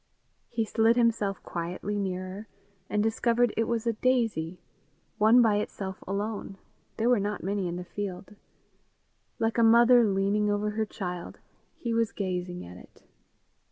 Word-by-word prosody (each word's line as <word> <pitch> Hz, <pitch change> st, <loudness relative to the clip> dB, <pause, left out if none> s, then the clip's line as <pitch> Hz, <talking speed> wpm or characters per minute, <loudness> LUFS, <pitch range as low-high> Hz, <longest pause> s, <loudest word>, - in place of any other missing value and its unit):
He 225 Hz, -1 st, -1 dB
slid 225 Hz, +2 st, +3 dB
himself 225 Hz, -5 st, +1 dB
quietly 180 Hz, +4 st, -4 dB
nearer, 185 Hz, +2 st, -4 dB, 0.4 s
and 210 Hz, 0 st, +1 dB
discovered 235 Hz, +1 st, +2 dB
it 225 Hz, -, +1 dB
was 235 Hz, -1 st, -1 dB
a 230 Hz, -, +1 dB
daisy 215 Hz, -9 st, 0 dB, 0.6 s
one 225 Hz, +4 st, +6 dB
by 215 Hz, -2 st, +3 dB
itself 195 Hz, -2 st, -5 dB
alone; 200 Hz, 0 st, -3 dB, 0.4 s
there 230 Hz, -, +1 dB
were 245 Hz, -3 st, +4 dB
not 205 Hz, +1 st, -3 dB
many 195 Hz, 0 st, -1 dB
in 170 Hz, -, -3 dB
the 180 Hz, -, -5 dB
field. 195 Hz, +1 st, -6 dB, 1.0 s
Like 225 Hz, +1 st, 0 dB
a -, -, +5 dB
mother 235 Hz, +2 st, +7 dB
leaning 205 Hz, 0 st, +1 dB
over 205 Hz, +1 st, 0 dB
her 220 Hz, +1 st, -1 dB
child, 180 Hz, -4 st, -6 dB, 0.4 s
he 235 Hz, -2 st, -3 dB
was 230 Hz, -1 st, +1 dB
gazing 180 Hz, -2 st, -3 dB
at 90 Hz, +1 st, -11 dB
it. -, -, -17 dB
210 Hz, 150 wpm, -28 LUFS, 190-230 Hz, 1.0 s, mother